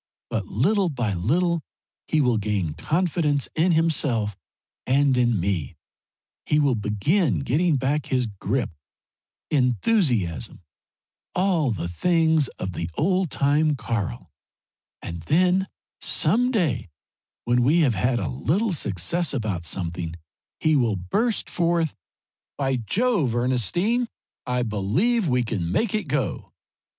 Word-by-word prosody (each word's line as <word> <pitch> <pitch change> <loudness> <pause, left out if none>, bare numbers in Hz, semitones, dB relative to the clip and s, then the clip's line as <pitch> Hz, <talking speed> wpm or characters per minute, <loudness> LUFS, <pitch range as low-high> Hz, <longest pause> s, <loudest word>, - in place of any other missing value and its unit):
But, - - -2
little 190 - +1
by 120 -8 -1
little, 165 - +1 0.5
he 155 - +2
will 125 -5 +2
gain 100 -7 -1
confidence 155 - 0
in 170 +2 +2
himself 140 - +1 0.5
and 135 +1 +3
in 120 -4 +2
me, 85 -6 -2 0.7
he 150 - +1
will 145 -3 +3
begin 110 - +1
getting 155 +4 +2
back 135 +3 -1
his 125 -2 +1
grip 110 +3 -2 0.8
enthusiasm 125 - +1 0.7
all 180 -6 +2
the 105 -6 -2
things 160 - +2
of 95 - -4
the 85 +1 -4
old 185 +2 +1
time 145 +3 +2
Karl, 100 - -4 0.7
and 85 -1 -6
then 180 - +2 0.3
some 230 +11 +2
day 165 - 0 0.6
when 120 +1 +2
we 150 +8 +4
have 135 -7 +3
had 120 +5 +1
a 95 -7 -2
little 170 - 0
success 140 - -1
about 105 -8 -2
something 85 -1 -4 0.4
he 155 0 +3
will 120 -6 +2
burst 210 - -1
forth 170 -3 0 0.6
'By 135 -2 0
Jove 170 - +1
Ernestine 130 - +1 0.4
I 125 0 0
believe 125 - +1
we 125 -1 +2
can 95 -7 -2
make 210 - +1
it 215 -6 -1
go!' 140 -1 -2
135 Hz, 125 wpm, -24 LUFS, 105-170 Hz, 0.8 s, we